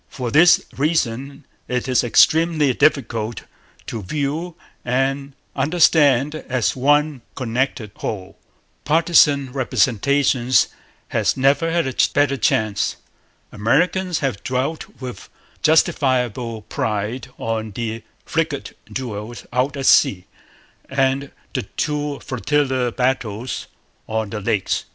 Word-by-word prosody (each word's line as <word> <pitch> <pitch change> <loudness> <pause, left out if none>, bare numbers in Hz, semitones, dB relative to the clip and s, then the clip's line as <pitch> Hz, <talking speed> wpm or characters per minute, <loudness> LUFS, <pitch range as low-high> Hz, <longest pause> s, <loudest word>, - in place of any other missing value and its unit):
For 125 -3 -4
this 170 +5 +6
reason 140 -2 -1 0.2
it 125 +1 -2
is 130 -1 +2
extremely 155 +3 +4
difficult 115 -6 0 0.4
to 115 - -5
view 150 - -3 0.3
and 135 +2 -1 0.2
understand 145 -2 +3 0.2
as 125 -4 0
one 145 +1 +2
connected 120 -3 -2
whole. 95 -3 -5 0.5
Partisan 150 -3 +4
misrepresentation 130 0 +1 0.6
has - - +1
never 140 +5 +3
had 170 0 +1
a 130 - -3 0.2
better 145 -1 +3
chance. 110 -4 0 0.6
Americans 175 - +1
have 105 -7 -3
dwelt 130 +5 -2
with 125 -2 -8 0.3
justifiable 125 -7 +1
pride 110 +3 -3
on 110 -1 -3
the 115 +2 -4 0.2
frigate 160 -3 -2 0.2
duels 120 -2 -6
out 130 +3 0
at 135 - -3
sea 90 -7 +4 0.6
and 135 0 0 0.2
the - - -1 0.2
two 150 -1 -2
flotilla 130 -1 0
battles 125 -2 -2 0.4
on 110 -2 -2
the 105 -2 -4
Lakes. 105 -2 -1
130 Hz, 105 wpm, -21 LUFS, 115-145 Hz, 0.6 s, this